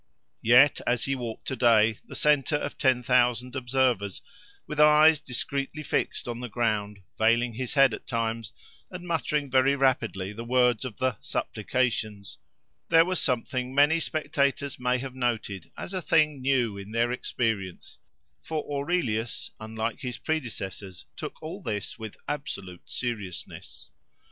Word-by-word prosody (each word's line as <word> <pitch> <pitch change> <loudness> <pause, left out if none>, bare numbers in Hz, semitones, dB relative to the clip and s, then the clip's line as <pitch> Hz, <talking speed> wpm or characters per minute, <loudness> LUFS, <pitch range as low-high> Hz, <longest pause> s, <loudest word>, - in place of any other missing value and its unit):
Yet, 125 +5 +6
as 120 -1 +1
he 135 - 0
walked 120 -4 -5
to 130 - -2
day, 115 -3 +4
the - - -9
centre 150 -1 +3
of 145 - -3
ten 130 -3 +2
thousand 125 0 +2
observers, 125 -6 0 0.4
with 150 - -5
eyes 150 0 +7
discreetly 140 +4 -3
fixed - - -1
on 120 -1 -4
the 125 -1 -5
ground, 105 -3 -1 0.2
veiling 115 +2 +3
his 125 +3 -4
head 135 -4 +6
at - - -7
times 115 -2 -2 0.4
and 180 -1 -8
muttering 150 -4 -1
very 130 +1 +4
rapidly 115 -8 0
the 115 +2 -6
words 125 -1 +2
of 120 -5 -6
the 130 -4 0
"supplications," 110 -3 -2 0.5
there 165 0 +6
was 185 -1 +2
something 125 0 -1
many 145 +4 +5
spectators 140 -3 -1
may 125 0 +1
have 130 0 -6
noted 115 -7 -2
as 195 - -6
a 185 - -2
thing 150 -4 +2
new 125 -6 +1
in 100 +1 -9
their 120 +1 +2
experience, 110 -7 -3 0.4
for 155 -2 -3
Aurelius, 140 -7 -1
unlike 110 +3 -4
his 125 -4 -4
predecessors, 100 - -4
took - - -7
all 175 +6 -6
this 105 - -4
with 110 -2 -7
absolute 95 -11 -6
seriousness. 105 -8 -5
125 Hz, 145 wpm, -27 LUFS, 110-140 Hz, 0.5 s, eyes